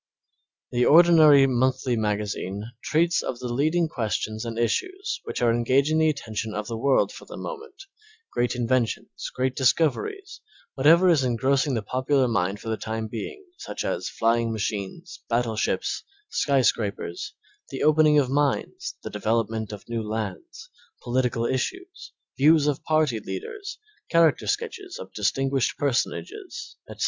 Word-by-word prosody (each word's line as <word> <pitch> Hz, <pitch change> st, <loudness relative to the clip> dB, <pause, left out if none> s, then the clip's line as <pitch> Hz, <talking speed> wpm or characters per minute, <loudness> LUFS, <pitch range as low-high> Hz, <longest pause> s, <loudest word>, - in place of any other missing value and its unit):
The 125 Hz, 0 st, +1 dB
ordinary 155 Hz, -2 st, +7 dB
monthly 130 Hz, -1 st, +1 dB
magazine 105 Hz, -2 st, -2 dB, 0.2 s
treats 170 Hz, +2 st, +2 dB
of 125 Hz, -, -4 dB
the 125 Hz, 0 st, -5 dB
leading 155 Hz, +6 st, +2 dB
questions 110 Hz, -4 st, -3 dB
and 115 Hz, -1 st, -5 dB
issues 375 Hz, -, -1 dB
which -, -, -3 dB
are 115 Hz, -1 st, +4 dB
engaging 135 Hz, +6 st, +2 dB
the 160 Hz, 0 st, +4 dB
attention 110 Hz, -6 st, -4 dB
of 105 Hz, 0 st, -3 dB
the 115 Hz, -, -4 dB
world 135 Hz, +4 st, +2 dB
for -, -, -11 dB
the -, -, -10 dB
moment, 440 Hz, -4 st, -8 dB, 0.5 s
great 120 Hz, +1 st, 0 dB
inventions, 120 Hz, -1 st, -1 dB
great 130 Hz, 0 st, 0 dB
discoveries, 390 Hz, -, 0 dB, 0.3 s
whatever 165 Hz, +7 st, +5 dB
is 160 Hz, -6 st, +4 dB
engrossing 130 Hz, +3 st, +1 dB
the 110 Hz, -, -2 dB
popular 130 Hz, +3 st, +1 dB
mind 100 Hz, -3 st, 0 dB
for 115 Hz, -, -10 dB
the 110 Hz, -, -1 dB
time 110 Hz, 0 st, -4 dB
being, 390 Hz, -, -6 dB
such -, -, -5 dB
as -, -, -2 dB
flying 115 Hz, 0 st, +1 dB
machines, 110 Hz, -, -4 dB
battleships, 115 Hz, -2 st, -1 dB, 0.3 s
sky 140 Hz, -, +2 dB
scrapers, 100 Hz, -7 st, -1 dB, 0.3 s
the 135 Hz, -, -4 dB
opening 155 Hz, 0 st, +5 dB
of 140 Hz, -3 st, +3 dB
mines, 140 Hz, +1 st, -1 dB
the -, -, -6 dB
development 110 Hz, 0 st, -1 dB
of 105 Hz, -, -9 dB
new 115 Hz, -1 st, -2 dB
lands, 105 Hz, -3 st, -6 dB, 0.3 s
the -, -, -28 dB
political 120 Hz, -1 st, 0 dB
issues, 370 Hz, -, -3 dB, 0.3 s
views 150 Hz, +1 st, +5 dB
of 145 Hz, -2 st, -1 dB
party 155 Hz, -7 st, +1 dB
leaders, 250 Hz, -, -7 dB, 0.3 s
character 165 Hz, -2 st, +3 dB
sketches 410 Hz, -3 st, -3 dB
of -, -, -10 dB
distinguished 135 Hz, +5 st, 0 dB
personages, 360 Hz, -, -3 dB
etc. -, -, -10 dB
130 Hz, 145 wpm, -25 LUFS, 115-155 Hz, 0.5 s, ordinary